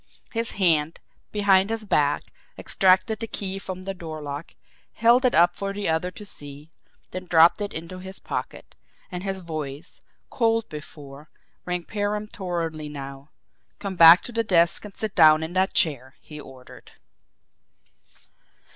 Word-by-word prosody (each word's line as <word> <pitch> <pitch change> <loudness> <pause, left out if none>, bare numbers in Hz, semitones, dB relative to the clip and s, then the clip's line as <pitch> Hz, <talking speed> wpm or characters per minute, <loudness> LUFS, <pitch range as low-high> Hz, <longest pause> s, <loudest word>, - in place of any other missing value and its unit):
His 230 -1 -2
hand, 165 -5 +1 0.3
behind 200 -1 +3
his 225 -1 -4
back, 145 -6 +1 0.3
extracted 190 +3 +2
the 225 - -4
key 195 -2 -4
from 185 -1 -7
the 195 +1 -4
door 160 -4 -8
lock, 145 +1 -7 0.4
held 240 +3 +4
it 250 - +2
up 175 +1 +4
for 195 0 -4
the 205 0 -3
other 160 +3 0
to 210 +3 -11
see, 145 -3 -8 0.4
then 185 0 -7
dropped 165 +4 +5
it 205 - -3
into 170 +3 -7
his 190 +1 -9
pocket - - -6 0.4
and 180 -1 -5
his 195 -1 -4
voice, 155 -3 -7 0.3
cold 225 -2 +1
before, 150 -1 -11 0.4
rang 180 -1 -2
peremptorily 185 -7 -3
now. 140 0 -9 0.5
"Come 195 -2 -5
back 170 +1 +8
to - - -7
the 230 0 0
desk 170 -5 +2
and 205 - -10
sit 215 -3 -3
down 155 -1 +6
in 160 +2 -6
that 190 +1 0
chair!" 135 -4 +2
he 150 -1 -11
ordered. 130 -3 -14
180 Hz, 150 wpm, -24 LUFS, 155-200 Hz, 0.5 s, back